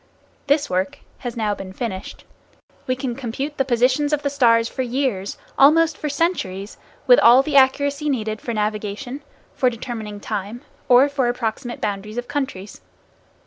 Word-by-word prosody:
This 285 +1 +2
work 185 +1 -1 0.2
has 240 -2 -6
now 215 -2 0
been 190 -2 -8
finished. 190 -3 -6 0.6
We 255 - +1
can 255 -1 -3
compute 270 +4 -5
the 270 - +2
positions 255 +4 +2
of 300 -1 0
the 280 - 0
stars 230 -5 +4
for 260 - -4
years, 245 -6 -2 0.2
almost 315 +3 +5
for 300 - -4
centuries, 275 - -2 0.3
with - - +7
all 245 +3 +7
the 295 0 -3
accuracy 285 +2 +3
needed 220 -5 -2
for 235 - -4
navigation, 215 +4 -3 0.3
for 255 - +2
determining 220 -3 -6
time 210 +3 -5 0.3
or 250 +3 +7
for 280 -3 0
approximate 240 +1 -3
boundaries 210 +2 -4
of 245 0 -3
countries. 265 -9 -4
245 Hz, 155 wpm, -21 LUFS, 215-280 Hz, 0.6 s, with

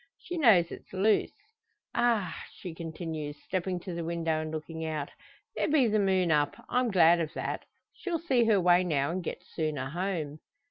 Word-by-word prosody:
She 355 - -7
knows 195 - +5
it's - - -10
loose. 205 +3 +2 0.6
Ah!" 225 -6 +1
she 180 -3 -7
continues, 160 -3 -5
stepping 185 -1 -2
to 180 - -6
the 170 0 -3
window, 165 -1 -1
and 155 - -4
looking 160 +1 -5
out, 155 -3 -3 0.4
"there - - 0
be 290 -5 +4
the 215 0 +2
moon 190 -3 +2
up! 145 -2 +2
I'm 250 -1 +2
glad 175 -3 +6
of 160 -2 -2
that; - - -3 0.3
she'll 360 -6 -3
see 270 -8 +2
her 215 -3 +4
way 180 0 +5
now, 145 -4 0
and 180 +1 -3
get 180 - -5
sooner 150 -7 -3
home." 165 -4 -3
175 Hz, 180 wpm, -29 LUFS, 160-200 Hz, 0.6 s, glad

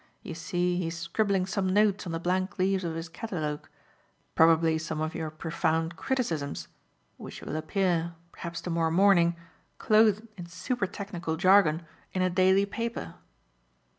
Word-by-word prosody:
"You - - -6
see 175 +2 -1
he 175 - -1
is 165 +1 -4
scribbling 190 +3 0
some 190 -1 -1
notes 205 -1 +2
on - - -3
the 165 - -2
blank 185 +2 -1
leaves 190 0 +1
of 165 -2 -3
his 165 +1 -4
catalogue; 160 -5 -4 0.6
probably 160 0 +4
some 160 -1 -4
of 155 +1 -2
your 160 -1 -3
profound 160 +1 -1
criticisms, 165 - -2 0.5
which - - -9
will - - -5
appear, 170 0 0 0.2
perhaps 170 0 -6
to 175 - -4
morrow 165 -1 +1
morning, 170 -1 +4 0.4
clothed 215 0 +3
in 175 -1 -7
super 195 +5 -2
technical 180 -5 -4
jargon, 175 -2 +4 0.3
in 185 - +1
a 185 - +1
daily 190 +2 +4
paper." 230 - -4
175 Hz, 155 wpm, -28 LUFS, 165-195 Hz, 0.6 s, probably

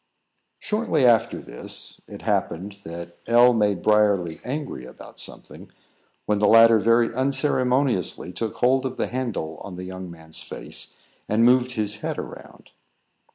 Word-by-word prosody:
Shortly 210 - 0
after 115 -1 +3
this, - - -2
it - - -11
happened 95 +4 -2
that 85 +1 -9
L 120 +1 +6
made 105 -5 +1
Briarly 100 -6 +2
angry 140 - -5
about 65 - -12
something, - - -6 0.5
when 105 -1 +1
the 105 - +3
latter 115 +1 +7
very 115 +2 +3
unceremoniously 130 - +1
took 110 +4 -4
hold 130 +2 +2
of 130 -1 -4
the - - 0
handle 115 -11 -4
on 95 +2 -9
the 90 - -7
young 95 0 -7
man's 80 -2 -7
face, - - -6 0.3
and 110 +2 +3
moved 125 +1 +4
his 105 -2 -1
head - - -4
around. - - -10
110 Hz, 145 wpm, -24 LUFS, 95-125 Hz, 0.5 s, latter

